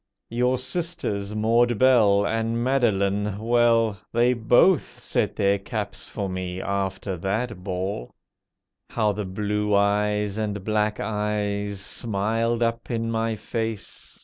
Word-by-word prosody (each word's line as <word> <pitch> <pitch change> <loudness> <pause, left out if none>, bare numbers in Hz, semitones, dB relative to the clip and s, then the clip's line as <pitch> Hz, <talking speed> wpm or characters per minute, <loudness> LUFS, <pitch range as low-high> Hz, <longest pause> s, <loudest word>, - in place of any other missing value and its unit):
Your 125 +2 +2
sisters, 130 - -3
Maud 115 +2 +3
Belle 105 -6 +5
And 115 +2 -1
Madeline—well, 110 -1 +2
They 120 +2 +3
both 125 +8 +3
set - - -1
their 100 0 +2
caps 100 -1 -5
for 100 -2 -3
me, 95 -1 -4
after 95 0 -2
that 100 +2 -2
ball. 90 -8 -4 0.7
How 105 -2 +1
the 105 0 -4
blue 105 +2 -1
eyes 105 0 +1
and 105 -2 -3
black 105 0 0
eyes 105 -2 -2
smiled 115 +3 -1
up 115 0 -2
in 115 -1 -1
my 115 0 0
face! 110 -1 -5
105 Hz, 120 wpm, -24 LUFS, 100-115 Hz, 0.7 s, Belle